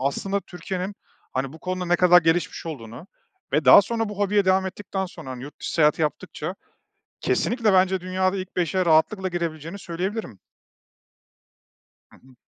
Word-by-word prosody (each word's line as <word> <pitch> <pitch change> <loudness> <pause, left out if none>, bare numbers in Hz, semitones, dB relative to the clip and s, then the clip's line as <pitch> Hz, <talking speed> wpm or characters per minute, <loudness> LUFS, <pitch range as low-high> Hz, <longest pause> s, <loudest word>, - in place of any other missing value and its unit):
aslında 195 +9 -1
Türkiye'nin, 185 +2 -5 0.4
hani, 130 +1 -2
bu 160 - -12
konuda 185 0 -3
ne 175 0 +3
kadar 180 0 +6
gelişmiş 165 +1 0
olduğunu 125 -1 -8 0.5
ve 150 0 +2
daha 130 +10 +9
sonra 225 +1 -2
bu 205 -1 -8
hobiye 205 0 +2
devam 190 0 +3
ettikten 190 0 -4
sonra, 135 -6 -10
hani, 125 -1 -7
yurt 145 +2 -11
dışı - - -4
seyahat 150 -2 +4
yaptıkça 160 +4 -3 0.7
kesinlikle 230 -4 +1
bence 185 0 +3
dünyada 185 +1 0
ilk 185 0 -7
5'e 180 +1 0
rahatlıkla 170 +4 +3
girebileceğini 170 0 -4
söyleyebilirim. 180 - -4 1.7
Hı - - -18
hı. 130 0 -21
180 Hz, 155 wpm, -24 LUFS, 155-190 Hz, 1.7 s, daha